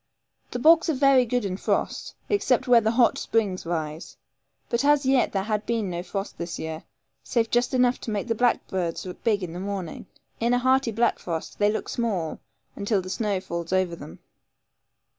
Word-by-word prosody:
The - - -4
bogs 325 +6 +5
are 315 - +1
very 270 -1 +5
good 245 -1 0
in 185 -1 -2
frost, - - -2
except 270 - +1
where 240 -2 +6
the 220 - +1
hot 235 +1 +3
springs 200 -6 -1
rise; 160 -1 -4 0.5
but 235 +3 0
as 290 -1 +4
yet 265 -1 +3
there 195 -1 -1
had 210 0 -1
been 225 -5 -1
no 175 0 -3
frost 195 +2 -5
this 170 0 -4
year, 160 0 -6 0.4
save 230 -2 0
just 240 +1 +2
enough 250 0 +2
to - - -6
make 210 -2 -2
the 230 - +1
blackbirds 190 -8 0
look 180 - -9
big 210 -4 +1
in 170 -2 -5
the 175 - -6
morning. 190 -3 -5 0.3
In 235 +2 +2
a - - +3
hearty 260 -1 +2
black 235 +2 +1
frost 165 -2 -5
they 205 0 +4
look 220 - -3
small, 200 -9 -2 0.4
until 205 0 0
the 185 - -6
snow 205 -4 -1
falls 170 -2 -5
over 185 -2 +1
them. 85 - -11
215 Hz, 195 wpm, -25 LUFS, 185-245 Hz, 0.5 s, where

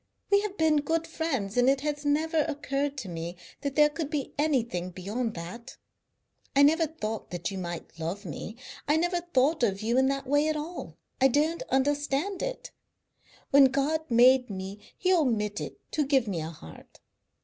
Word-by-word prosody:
We 400 0 +6
have 410 -1 -5
been 315 -1 +3
good 320 +3 0
friends, 270 -11 -2
and 245 +1 +5
it 270 0 +2
has 295 0 -2
never 310 +2 +1
occurred 285 -1 -2
to 240 -7 -5
me 170 0 -5 0.2
that 280 -1 -3
there 300 -1 +6
could 300 0 -4
be 295 -3 -3
anything 235 - 0
beyond 210 +6 -3
that. 180 +9 -8 0.8
I 280 - +7
never 320 +3 +4
thought 225 -9 -5
that 175 +2 -3
you 195 - -4
might 170 -2 -6
love 175 +6 -4
me. 180 +7 -6 0.3
I 300 +2 +4
never 350 +1 +1
thought 310 -3 +1
of 200 -3 +1
you 235 +3 +2
in 265 - +4
that 275 0 -1
way 290 +3 +2
at 310 - +1
all, 320 +4 -6 0.2
I 265 - +7
don't 305 +5 +1
understand 290 +7 0
it. - - -4 0.8
When 275 0 +8
God 290 +4 0
made 250 +1 +5
me 195 +1 -6 0.2
He 370 0 +2
omitted 225 - 0 0.2
to 305 - +1
give 270 -4 +2
me 180 -5 -2
a 155 - -4
heart. 80 - -13
275 Hz, 180 wpm, -28 LUFS, 215-310 Hz, 0.8 s, When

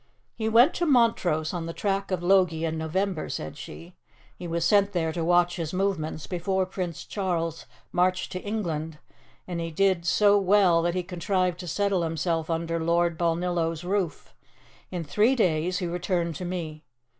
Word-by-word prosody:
"He 220 -1 -2
went 240 +8 +6
to 345 - -1
Montrose 225 - +2
on 170 -2 -3
the 165 - -6
track 195 -1 -1
of 185 -2 -2
Logie 175 -3 +3
in 160 0 -2
November," 165 +3 -2
said 75 - -5
she; 80 +2 -10 0.4
"he 175 - -7
was 170 0 -1
sent 200 +1 +3
there 165 -3 0
to 165 0 -3
watch 175 +1 +3
his 165 -2 -4
movements 165 -6 -1
before 185 +4 -1
Prince 180 -3 -5
Charles 170 -5 -3 0.2
marched 185 +1 +1
to 185 - -4
England, 165 -7 -3 0.5
and 175 -2 -4
he 165 - -3
did 180 0 +1
so 205 +1 +5
well 190 -3 +4
that 175 +1 0
he 180 - -1
contrived 180 0 -1
to 180 - -7
settle 200 0 0
himself 165 0 -1
under 165 0 -1
Lord 170 +1 +1
Balnillo's 170 -1 -1
roof. 185 -4 -2 0.6
In 175 -2 -4
three 210 - +2
days 180 -4 +1
he 180 - -2
returned 175 -1 -1
to 180 - -5
me. 165 -4 -5
175 Hz, 170 wpm, -26 LUFS, 165-190 Hz, 0.6 s, went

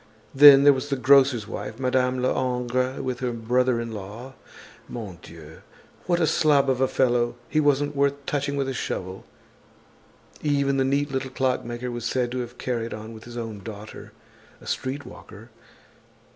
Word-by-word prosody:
Then 140 0 +9
there 145 0 +7
was 135 +2 -4
the 140 - 0
grocer's 130 -4 +4
wife, 105 +4 -6
Madame 130 -1 0
Lehongre 125 0 -1
with 130 -2 -3
her 125 -1 -2
brother 120 +2 +1
in 115 0 -5
law. 110 +5 -8 0.6
Mon 100 -8 -7
Dieu! 80 -1 -13 0.5
What 175 -1 +2
a 165 - +3
slob 145 -3 +3
of 130 0 -1
a 130 - +4
fellow. 120 -2 +1
He 155 - 0
wasn't 145 0 +1
worth 140 0 +2
touching 140 -1 -2
with 140 -1 -1
a 135 - -2
shovel. 95 -6 -5 1.2
Even 140 -2 +1
the 135 - +2
neat 140 +2 0
little 130 0 -2
clockmaker 125 -2 -2
was 120 -1 -5
said 125 -1 -1
to 130 - -3
have 120 0 -6
carried 115 -2 -3
on 110 +1 -9
with 110 0 -12
his 120 0 -9
own 115 -3 -5
daughter, 105 0 -10 0.5
a - - -16
streetwalker. 125 -4 -6
125 Hz, 165 wpm, -24 LUFS, 115-135 Hz, 1.2 s, Then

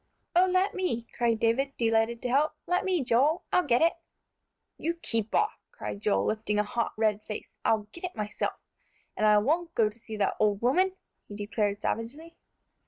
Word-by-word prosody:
"Oh, 365 +2 +6
let 370 +2 +2
me!" 360 -12 -1
cried 235 -2 +1
David, 270 +5 +1
delighted 225 0 +1
to 250 - -1
help. 290 +5 +2
"Let 360 +2 +1
me, 365 -6 +1
Joel; 270 +7 +2
I'll 360 -4 +3
get 245 +3 +4
it!" 335 - +4 0.9
"You 335 +2 -1
keep 225 -9 -1
off," 430 0 +1
cried - - -6
Joel, 210 -1 +2
lifting 215 -1 -1
a 210 - +3
hot, 230 +3 -2
red 215 -1 +1
face; 210 0 -7
"I'll 220 -1 +2
get 345 - -7
it 360 - -6
myself. 210 -1 -2 0.6
And 215 - +2
I 210 0 +6
won't 330 +10 0
go 220 -2 +3
to 215 +3 -16
see 220 -1 -8
that 205 - 0
old 210 -2 +2
woman!" 365 - +2 0.3
he 205 - -9
declared 205 0 -1
savagely. 290 +9 -4
235 Hz, 185 wpm, -28 LUFS, 215-330 Hz, 0.9 s, Oh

